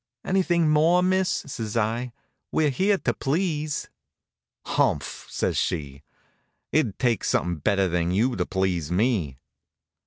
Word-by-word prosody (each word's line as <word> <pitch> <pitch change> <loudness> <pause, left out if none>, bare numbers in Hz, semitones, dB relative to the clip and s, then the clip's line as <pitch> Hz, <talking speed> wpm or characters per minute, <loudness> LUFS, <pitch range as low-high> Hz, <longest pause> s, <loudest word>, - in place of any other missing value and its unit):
"Anything 175 -3 +2
more, 160 +4 +4
miss?" 185 0 +2
says 115 -5 -3
I. 115 +3 -1 0.4
"We're 150 -2 +2
here 195 +9 +2
to - - -1
please." 155 0 -1 0.8
"Humph!" - - -1
says - - -1
she. 70 -5 -2 0.7
"It'd 125 -11 +1
take 120 -4 +1
somethin' 85 0 0
better 95 +5 +2
than 85 -1 0
you 115 +7 +1
to - - -2
please 90 -5 -1
me." 90 - 0
120 Hz, 125 wpm, -25 LUFS, -, 0.8 s, more